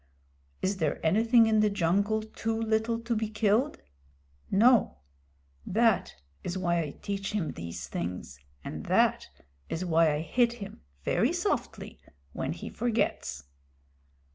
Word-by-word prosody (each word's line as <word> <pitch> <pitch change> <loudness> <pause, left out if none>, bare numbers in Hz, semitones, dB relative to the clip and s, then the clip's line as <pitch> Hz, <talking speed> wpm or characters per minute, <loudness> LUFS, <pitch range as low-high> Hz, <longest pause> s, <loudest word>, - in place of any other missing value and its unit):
"Is 195 +1 0
there 160 -4 0
anything 225 +7 +5
in 220 -1 +3
the 210 0 +4
jungle 200 +3 +1
too 225 +1 -3
little 225 +1 0
to 230 0 -1
be 215 0 -1
killed? 215 +6 +1 0.7
No. 230 - +4 0.7
That 225 +1 +2 0.3
is 180 +1 -3
why 175 -2 +1
I 155 - -3
teach 200 0 -3
him 195 -7 -1
these 85 0 -7
things, 85 -6 -5 0.2
and - - -6
that - - +3 0.4
is 175 +3 -2
why 165 -2 +4
I 150 - -2
hit 235 +9 +2
him, 205 -4 -9 0.2
very 220 - +2
softly, 355 +3 -2 0.3
when - - -2
he - - -8
forgets." 220 - -1
210 Hz, 135 wpm, -29 LUFS, 175-225 Hz, 0.7 s, anything